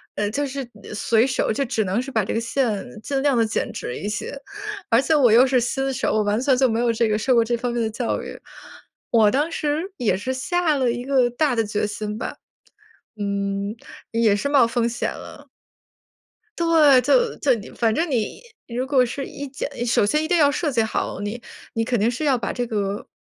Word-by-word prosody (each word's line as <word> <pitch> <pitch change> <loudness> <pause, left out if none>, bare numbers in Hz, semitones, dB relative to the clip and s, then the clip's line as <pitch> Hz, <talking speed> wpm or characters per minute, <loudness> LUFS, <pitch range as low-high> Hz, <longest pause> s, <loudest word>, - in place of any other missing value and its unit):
呃， 205 0 -1
就 285 +4 -1
是 270 -1 -5 0.3
随 225 +3 +2
手， 255 - 0
就 275 +5 0
只 230 -3 0
能 195 +5 0
是 270 - -7
把 220 -5 +1
这 - - -3
个 225 - 0
线 230 -3 -1 0.2
尽 275 -1 -1
量 280 -3 +2
地 230 -1 +3
剪 215 - -2
直 125 - -5
一 205 - -4
些， 210 +6 -4 0.6
而 230 +3 +5
且 320 - +1
我 270 -6 +5
又 240 +4 +7
是 255 -1 +3
新 270 +3 -1
手， - - -1
我 215 -1 +2
完 205 +2 +1
全 265 0 +3
就 260 -1 +3
没 225 +1 0
有 240 -1 +2
这 225 -1 +1
个 210 - +1
受 255 +4 +1
过 230 - +5
这 240 +1 -1
方 240 0 -2
面 240 - -1
的 220 - 0
教 230 +2 -2
育。 - - -8 0.7
我 220 -3 +5
当 295 +7 0
时 315 +5 -2
也 210 -6 +1
是 255 +7 -3
下 310 +3 0
了 255 -2 +1
一 245 +1 -2
个 260 -2 +2
大 270 +2 +1
的 225 - +2
决 210 0 -1
心 210 0 -5
吧， - - -5 0.8
嗯， 200 +1 -2 0.4
也 225 -3 +3
是 205 - -2
冒 275 -5 +4
风 235 0 0
险 235 - -2
了。 - - -11 1.1
对， 310 -6 +5
就 475 - +2
就 270 - +2
你 220 -1 -8
反 225 -2 0
正 330 -1 0
你 230 - -2 0.2
如 250 +2 -3
果 265 -2 +4
是 270 +3 -4
一 285 - -7
剪 270 - -4 0.2
首 225 -3 +2
先 300 +8 +1
一 - - -1
定 350 - +3
要 290 -2 +5
设 300 +1 -1
计 230 -2 +2
好， 220 -2 -2
你 210 +4 -4 0.3
你 225 0 0
肯 240 -3 0
定 225 +3 +3
是 275 +6 -4
要 265 -4 +3
把 - - -3
这 245 0 -2
个 205 -3 -3
240 Hz, 240 characters per minute, -22 LUFS, 220-275 Hz, 1.1 s, 又